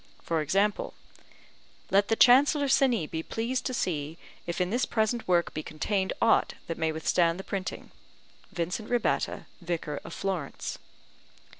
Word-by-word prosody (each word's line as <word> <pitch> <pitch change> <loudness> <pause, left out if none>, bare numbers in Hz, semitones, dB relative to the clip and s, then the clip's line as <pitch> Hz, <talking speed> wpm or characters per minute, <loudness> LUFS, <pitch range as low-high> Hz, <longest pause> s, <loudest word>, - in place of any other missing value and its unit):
For 165 -2 0
example: 195 +7 0 1.0
Let 200 +1 +4
the 225 - +2
Chancellor 280 +5 +6
Cini 255 - +3
be 160 +1 -4
pleased 245 +7 -2
to 255 - -3
see 155 -5 -2 0.3
if 170 - -3
in 180 +1 0
this 245 +3 +1
present 220 +1 0
work 175 -1 +2
be 155 - -3
contained 190 +6 -1
aught 230 - +3
that 165 - -5
may 160 -1 +1
withstand 165 +2 +1
the - - -5
printing. 190 -2 -5 0.6
VINCENT 180 +6 -3
RABBATTA, 245 -2 0 0.2
Vicar 165 -4 -3
of - - -9
Florence. 185 -8 -3
190 Hz, 145 wpm, -28 LUFS, 165-225 Hz, 1.0 s, Chancellor